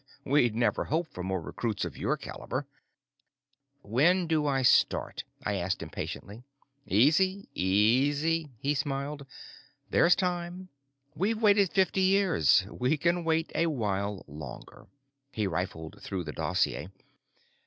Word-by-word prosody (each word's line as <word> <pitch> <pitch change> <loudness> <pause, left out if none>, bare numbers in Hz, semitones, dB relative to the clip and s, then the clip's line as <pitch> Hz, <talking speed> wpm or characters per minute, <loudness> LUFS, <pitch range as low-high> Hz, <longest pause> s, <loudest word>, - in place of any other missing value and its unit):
We'd 125 -5 +3
never 120 +1 +1
hoped 160 +2 -2
for 90 - -6
more 95 +1 -2
recruits 105 +5 -3
of - - -7
your - - -1
caliber." 135 +2 -5 1.2
"When 160 - +3
do 155 -2 +1
I 135 -2 +1
start?" - - +2 0.2
I - - -1
asked - - -2
impatiently. 105 +4 -7 0.5
"Easy, 185 - +3
easy," 140 - +2
he 140 +6 0
smiled. 140 0 -3 0.6
"There's 175 - +5
time. 180 0 -3 0.4
We've 215 +6 0
waited 205 -4 +4
fifty 190 0 +2
years; 185 - +4
we 125 +5 0
can 170 +3 +1
wait 160 0 0
a 170 - +1
while 105 - -2
longer." 70 -3 -10 0.4
He 110 -5 -1
riffled 80 -3 -4
through 95 -3 -4
the 75 -2 -6
dossier. 90 - -1
140 Hz, 125 wpm, -29 LUFS, 105-175 Hz, 1.2 s, There's